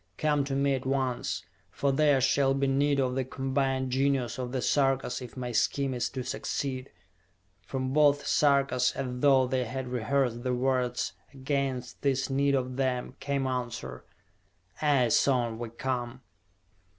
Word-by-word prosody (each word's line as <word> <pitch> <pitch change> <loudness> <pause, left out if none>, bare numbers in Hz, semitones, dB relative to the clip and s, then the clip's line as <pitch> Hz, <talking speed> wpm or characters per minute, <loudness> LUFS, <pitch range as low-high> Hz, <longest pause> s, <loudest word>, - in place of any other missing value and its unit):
Come 150 -2 +1
to 135 -1 -3
me 140 0 +2
at 130 -1 -3
once! 130 -2 -1 0.2
For 140 - 0
there 145 -1 +3
shall 135 +1 +3
be 140 0 +1
need 140 +1 +2
of 130 -1 +1
the 130 0 0
combined 135 0 -1
genius 130 -2 0
of 125 -1 -3
the 130 - -1
Sarkas 135 -1 +1
if 125 0 -9
my 125 -1 -3
scheme 135 +3 +1
is 125 - -1
to 130 -2 -5
succeed!" 130 +1 -3 0.8
From 130 -1 -2
both 145 -1 +4
Sarkas, 140 -3 +2
as 125 -2 -4
though 135 -1 +5
they 130 0 -1
had 130 +2 -5
rehearsed 125 0 0
the 125 0 -1
words 125 -1 0 0.2
against 135 -2 -3
this 135 -1 0
need 140 +1 +2
of 130 -1 -2
them, 130 -2 -1
came 140 -1 -1
answer: 120 - -4 0.8
"Aye, 140 -5 +3
son, 120 -2 +2
we 120 -1 -4
come!" 125 +1 -4
130 Hz, 155 wpm, -28 LUFS, 125-140 Hz, 0.8 s, though